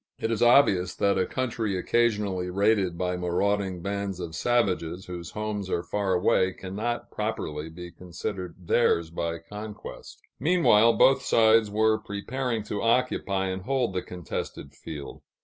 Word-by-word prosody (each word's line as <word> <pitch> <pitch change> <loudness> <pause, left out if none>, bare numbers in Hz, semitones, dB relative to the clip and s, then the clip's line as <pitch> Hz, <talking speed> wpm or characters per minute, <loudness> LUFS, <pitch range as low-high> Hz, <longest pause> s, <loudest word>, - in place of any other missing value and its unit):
It 115 - -2
is 115 - -1
obvious 110 -8 +5
that 100 -1 +2
a 95 - +1
country 115 -6 -2
occasionally 100 -4 +1
raided 100 -2 +2
by 90 0 -1
marauding 90 +1 -1
bands 100 -1 -3
of 85 -2 -5
savages, 95 -3 0
whose 85 -2 -7
homes 105 -2 -4
are 85 - -1
far 100 -1 -1
away, 95 0 +2
cannot 105 +7 -4
properly 80 -8 -3
be 85 +1 -9
considered 90 +1 -6
theirs 85 -3 +1
by 85 0 -2
conquest. 105 +5 -9 0.2
Meanwhile, 125 -8 +5
both 135 0 +5
sides 110 -3 +4
were 110 +1 +2
preparing 115 +3 -3
to 105 -1 -4
occupy 115 -5 +1
and 95 0 -3
hold 125 -1 0
the 90 - -1
contested 85 -5 -6
field. 75 -3 -8
100 Hz, 145 wpm, -27 LUFS, 90-110 Hz, 0.2 s, obvious